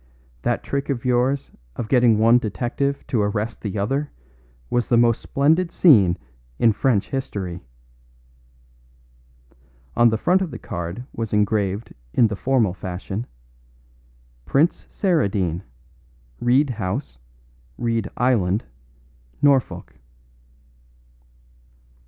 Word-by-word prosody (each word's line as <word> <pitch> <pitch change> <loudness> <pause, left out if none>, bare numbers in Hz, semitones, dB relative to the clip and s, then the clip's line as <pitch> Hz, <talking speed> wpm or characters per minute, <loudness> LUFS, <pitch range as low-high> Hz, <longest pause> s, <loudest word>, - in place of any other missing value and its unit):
That - - -1
trick 140 +1 -3
of 130 -3 -2
yours 125 +2 +1 0.2
of 115 - -4
getting 120 -3 +4
one 115 +3 +5
detective 120 +7 -2
to 115 - 0
arrest 105 +1 -2
the 105 -1 -4
other 135 +9 -1 0.6
was 120 - 0
the 120 - +3
most 115 -1 +3
splendid 160 +5 +1
scene 100 - +5 0.4
in 115 - +4
French 115 -3 0
history." 95 -10 -4 2.3
On 120 0 +5
the 110 - 0
front 180 - +2
of 185 - -1
the - - -7
card 85 +8 -6
was 115 -2 -4
engraved 105 0 0 0.2
in 120 - +5
the 105 - -3
formal 120 -4 +1
fashion, 95 +4 -5 1.2
"Prince 145 - +1
Saradine, 100 - 0 0.8
Reed 130 +3 +3
House, 105 - -4 0.6
Reed 115 -3 -1
Island, 110 -6 +1 0.7
Norfolk." 135 - +1
115 Hz, 105 wpm, -22 LUFS, 100-135 Hz, 2.3 s, one